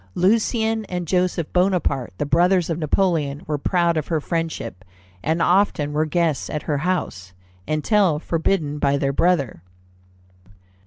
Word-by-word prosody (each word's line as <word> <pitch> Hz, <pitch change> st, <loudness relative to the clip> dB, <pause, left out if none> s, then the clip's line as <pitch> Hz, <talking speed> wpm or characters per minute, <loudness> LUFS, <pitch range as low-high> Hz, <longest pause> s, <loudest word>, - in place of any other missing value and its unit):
Lucien 220 Hz, +3 st, +1 dB
and 180 Hz, -3 st, -4 dB
Joseph 180 Hz, -2 st, 0 dB
Bonaparte, 180 Hz, -, +1 dB
the -, -, -1 dB
brothers 175 Hz, +3 st, +2 dB
of 165 Hz, -, -2 dB
Napoleon, 155 Hz, -3 st, 0 dB
were 150 Hz, -2 st, -2 dB
proud 170 Hz, +1 st, +1 dB
of 155 Hz, -, -2 dB
her 160 Hz, -2 st, 0 dB
friendship, 155 Hz, -, -4 dB, 0.4 s
and 160 Hz, -, 0 dB
often 175 Hz, -6 st, +2 dB
were 155 Hz, +1 st, +1 dB
guests 160 Hz, -2 st, 0 dB
at 150 Hz, -, -4 dB
her 145 Hz, -2 st, -1 dB
house, 140 Hz, -, -3 dB, 0.3 s
until 165 Hz, +2 st, +2 dB
forbidden 160 Hz, -2 st, -1 dB
by 140 Hz, -1 st, +2 dB
their 140 Hz, 0 st, 0 dB
brother. 140 Hz, -, +1 dB
165 Hz, 140 wpm, -22 LUFS, 145-180 Hz, 0.4 s, brothers